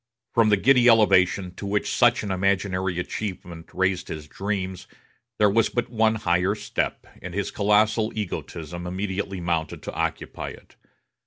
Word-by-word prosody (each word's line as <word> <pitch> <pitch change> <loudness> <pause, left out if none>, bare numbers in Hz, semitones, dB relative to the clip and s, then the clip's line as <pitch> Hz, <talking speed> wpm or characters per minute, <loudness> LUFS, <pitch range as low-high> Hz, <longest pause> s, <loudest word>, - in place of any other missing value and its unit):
From 115 -2 +4
the 105 - +4
giddy 125 +3 +5
elevation 95 -4 +4
to - - -6
which 105 +1 -1
such 120 -1 +4
an 100 - -3
imaginary 95 -1 0
achievement 90 -3 -5
raised 95 -1 0
his 75 -2 -7
dreams, 95 +1 -4 0.5
there 105 - +5
was 110 +2 +3
but 120 -1 -2
one 110 -1 +2
higher 90 -1 +1
step, - - -3 0.2
and 90 0 -7
his 100 -1 -2
colossal 110 +1 +2
egotism 85 -4 -5
immediately 95 +1 -3
mounted 85 -3 -2
to - - -6
occupy - - -3
it. - - -14
100 Hz, 150 wpm, -24 LUFS, 90-105 Hz, 0.5 s, giddy